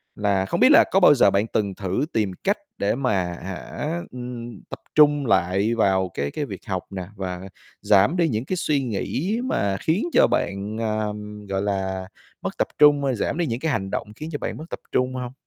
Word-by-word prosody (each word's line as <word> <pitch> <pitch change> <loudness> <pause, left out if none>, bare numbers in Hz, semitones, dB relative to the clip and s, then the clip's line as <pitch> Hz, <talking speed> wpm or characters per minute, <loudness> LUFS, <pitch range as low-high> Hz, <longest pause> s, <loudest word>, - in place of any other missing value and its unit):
là 100 -2 +1
không - - -2
biết - - +7
là 325 +3 +8
có 195 - +4
bao 165 -5 +7
giờ 100 -6 +5
bạn 100 +3 +1
từng 100 -4 -1
thử 95 +8 -1
tìm 105 -4 +1
cách 200 +2 +2 0.2
để 100 +3 +1
mà, 125 -4 0 0.3
hả, 95 - -5 0.2
ừm, 120 -3 -7
tập - - -7 0.2
trung 145 -2 +5
lại 95 +2 +2
vào 95 -4 +2
cái 70 0 -2
cái 150 - -3
việc - - -8
học 95 -2 -2
nè, 95 -2 -5
và 90 -2 -4 0.4
giảm 105 - +4
đi 170 -2 +3
những 115 +2 -2
cái 185 - -2
suy 145 -4 +1
nghĩ 140 - -2
mà 100 - 0
khiến 165 - +1
cho - - +6
bạn, 100 +3 -2
à, 110 -1 0 0.4
gọi 95 0 -1
là, 95 -2 -2 0.3
mất - - -4
tập - - +1
trung, 145 -1 +6
ơ, 135 - +1
giảm 125 - -2
đi 175 - +1
những 115 -2 -2
cái 160 0 0
hành 95 -6 -2
động - - -3
khiến 155 +1 -7
cho 145 - -2
bạn - - -4
mất 155 - -8
tập - - -5
trung 125 0 +1
hông? 125 -1 -4
110 Hz, 215 wpm, -23 LUFS, 95-145 Hz, 0.4 s, là